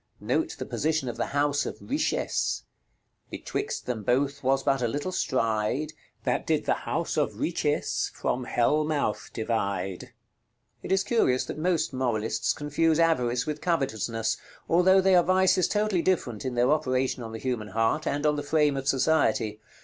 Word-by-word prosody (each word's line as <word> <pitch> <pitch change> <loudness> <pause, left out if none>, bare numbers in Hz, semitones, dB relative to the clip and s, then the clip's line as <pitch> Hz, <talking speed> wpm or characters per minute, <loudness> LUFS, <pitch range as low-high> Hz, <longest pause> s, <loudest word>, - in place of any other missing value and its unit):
Note - - -1
the - - -5
position 155 -3 -1
of 120 - -4
the - - -1
house 145 0 +1
of - - -5
Richesse: 295 +3 -1 0.7
"Betwixt 440 +3 -4
them 120 -3 -3
both 140 +6 0
was 135 +1 +2
but 135 -2 +1
a 120 - +2
little 145 +9 -3
stride, 130 -1 0 0.3
That - - -1
did - - +1
the - - +3 0.2
House - - -1
of - - 0
Richesse - - 0
from 125 0 -2
Hell 145 +5 +2
mouth 150 -8 -1
divide." 100 -5 -2 0.7
It - - -6
is 190 0 +3
curious 190 - +2
that - - -6
most 170 -3 0
moralists 120 -4 0
confuse 150 +2 +1
avarice 125 -6 +2
with 150 -1 -4
covetousness, 115 - -1 0.3
although 185 +3 +5
they 190 0 +3
are 180 - +7
vices 185 +1 +3
totally 210 -4 +1
different 135 - -1
in 130 -1 -2
their 120 +3 +3
operation 130 -4 0
on 115 -1 -6
the 110 - -5
human 120 -3 -3
heart, 115 +8 0
and 145 +1 -1
on 150 0 +2
the - - -1
frame 150 -1 +2
of 135 0 -4
society. 110 -7 +2
140 Hz, 165 wpm, -27 LUFS, 120-160 Hz, 0.7 s, are